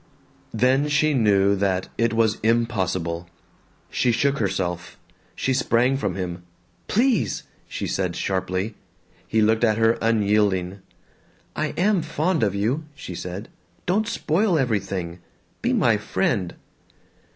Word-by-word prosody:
Then 130 +5 +2
she 150 +1 +2
knew 100 -5 +3
that 95 -1 0
it 115 0 +1
was 115 -1 +1
impossible. 95 -7 0 0.6
She 125 - +2
shook 140 +4 +1
herself. 90 -4 -2 0.4
She 130 - 0
sprang 125 0 +2
from 135 - -2
him. 90 -2 -4 0.5
"Please!" 245 +2 +1 0.2
she - - -4
said 90 -3 -1
sharply. 95 +2 -2 0.5
He 110 -1 +2
looked 110 +2 +2
at 110 -2 +3
her 115 +1 +3
unyielding. 105 -4 +1 0.8
"I 155 - 0
am 195 +1 +3
fond 160 +2 0
of 100 -2 +1
you," 120 +10 0
she 95 - -8
said. 90 +5 -6 0.4
"Don't 210 +5 +1
spoil 185 -2 +1
everything. 95 - -2 0.4
Be - - +1
my - - +3
friend." 90 -3 -1
110 Hz, 125 wpm, -23 LUFS, 95-135 Hz, 0.8 s, knew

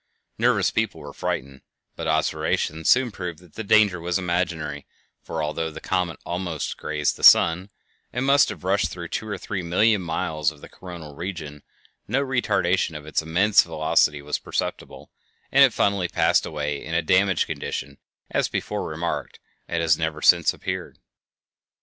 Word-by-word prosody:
Nervous - - +3
people - - -1
were - - -9
frightened, 70 0 -4 0.3
but 85 - -5
observation 80 0 0
soon 125 -1 +4
proved 90 -4 -6
that 90 -1 -19
the 110 - -5
danger 105 -3 +4
was 90 +2 0
imaginary, 85 -5 -2 0.3
for 80 -1 -4
although 80 +2 -2
the 80 - -9
comet 90 -3 -1
almost 85 -3 -3
grazed 75 -1 -1
the - - -12
sun, 90 +4 +6 0.4
and 125 +2 -2
must 140 +1 +5
have - - -8
rushed 95 +2 +1
through 85 -2 -7
two 110 - -4
or 100 -2 -3
three 95 0 -4
million 95 +5 +2
miles 80 -3 -1
of 80 - -14
the - - -11
coronal 85 -5 -10
region, 80 -5 -6 0.5
no 125 +6 +1
retardation 100 - +1
of 75 - -11
its 75 - -1
immense 90 +6 +4
velocity 80 -2 +1
was 75 0 -2
perceptible, - - -5 0.4
and - - +7
it - - +6
finally 100 -3 +1
passed - - +2
away 75 -2 -3
in 80 +2 -4
a 85 - +2
damaged 95 +1 +3
condition, - - -5 0.3
as - - +1
before - - -3
remarked, 80 +2 -4 0.3
and 85 -1 -1
has 80 -1 +3
never 80 -1 -2
since - - +5
appeared. - - -5
85 Hz, 165 wpm, -24 LUFS, 80-95 Hz, 0.5 s, and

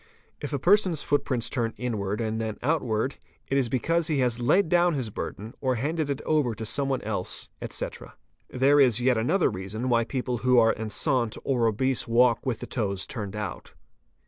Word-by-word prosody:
If 145 - -5
a 140 - 0
person's 180 0 +3
foot 145 - +1
prints 125 -4 -1
turn 115 -3 -2
inwards 105 -2 -2
and 110 0 -2
then 110 -1 -3
outwards, 130 -4 0 0.3
it 135 - 0
is 135 -4 +1
because 165 +7 0
he 155 - 0
has 125 -3 +1
laid 165 +11 +3
down 175 0 +3
his 125 -6 -3
burden 110 +3 -6
or 130 -2 +1
handed 150 +5 -2
it 140 0 -3
over 145 -7 +1
to 110 +2 -6
some 140 +5 -1
one 135 -2 -1
else, 105 -4 -3
etc. - - -5 0.3
There 140 +3 +3
is 125 -5 +5
yet 125 -2 +2
another 160 - +2
reason 105 +6 -4
why 115 -1 +3
people 125 -1 -2
who 125 +1 +3
are 115 -1 +5
enceinte 115 +2 0
or 120 -4 +1
obese 130 +4 0
walk 120 0 +3
with 120 -4 -2
the - - -4
toes 100 -5 -2
turned 105 -4 -6
out. 105 -2 -6
125 Hz, 195 wpm, -26 LUFS, 110-140 Hz, 0.3 s, is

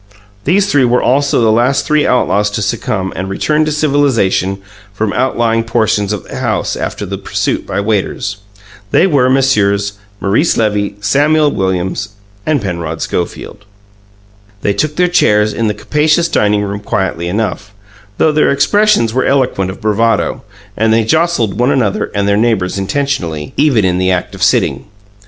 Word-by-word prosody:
These 190 +6 +3
three 140 -6 +3
were 125 0 +2
also 140 0 +2
the 110 -1 +3
last 120 +5 +2
three 150 0 +2
outlaws 105 -4 +1
to 110 - -2
succumb 95 -1 -2
and 95 +1 -4
return 150 +10 0
to 155 - -1
civilization 135 -11 +1 0.3
from 105 +1 -2
outlying 115 -3 0
portions 110 -3 0
of 105 -3 -3
the - - -9
house - - -1
after - - -4
the - - -5
pursuit - - -2
by - - -2
waiters. 105 -1 -2 0.5
They - - +4
were 140 -8 +2
Messieurs 105 -7 +1 0.2
Maurice 110 - +1
Levy, 105 -2 0
Samuel 145 +8 +2
Williams, 95 +1 -2 0.3
and 155 -2 +2
Penrod 85 -4 -4
Schofield. 105 - -4 1.0
They 100 - +1
took 150 +9 -1
their 180 +2 +2
chairs 105 -11 +2
in 115 - -1
the 105 - -1
capacious 155 +3 +1
dining 105 -8 +1
room 100 0 -4
quietly 95 -5 -2
enough, 105 +1 -3 0.5
though 155 - +3
their 150 0 +2
expressions 200 - +2
were 130 +1 +1
eloquent 125 -9 +1
of 95 - -8
bravado, 110 +2 0 0.3
and 110 +1 +1
they 115 0 +3
jostled 155 - 0
one 125 +2 +2
another 115 -8 +1
and 100 0 0
their 100 0 +2
neighbours 105 -5 0
intentionally, 95 - -2
even 135 -9 +2
in 90 -1 +1
the 95 0 +1
act 90 -1 -1
of - - -10
sitting. - - +1
110 Hz, 160 wpm, -14 LUFS, 100-140 Hz, 1.0 s, They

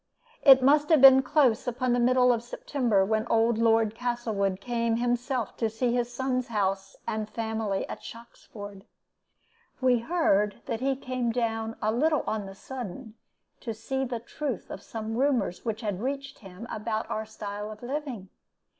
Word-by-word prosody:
"It 265 -2 +8
must 295 +2 +4
have 320 -3 +6
been 265 0 +9
close 260 -4 +2
upon 245 0 0
the 245 - +2
middle 250 0 +4
of 230 - -2
September 240 -4 0
when 220 +2 0
old 230 0 +2
Lord 225 -1 +3
Castlewood 225 -5 -1
came 235 0 -1
himself 245 0 -1
to 225 - 0
see 235 +2 -1
his 245 0 0
son's 255 0 -1
house 195 -3 -1
and 215 -1 -2
family 220 -3 -2
at - - -7
Shoxford. 205 -4 -11 0.9
We 255 -2 +3
heard 225 - +1
that 225 - -3
he 270 +2 0
came 255 -2 -2
down 225 -1 -2
a 215 - +2
little 300 +6 +2
on 210 -2 -2
the 195 - -10
sudden 240 0 -7 0.5
to 225 -3 -5
see 245 +5 -4
to 265 - +1
the 240 -2 -3
truth 255 0 -5
of 195 - -7
some 225 +1 -5
rumors 245 -10 0
which 225 0 -2
had 205 -4 -3
reached 275 +2 -4
him 190 +2 -10
about 215 +1 -3
our 220 0 -3
style 210 -1 -6
of 215 +2 -11
living. 255 -7 -5
230 Hz, 170 wpm, -27 LUFS, 215-255 Hz, 0.9 s, been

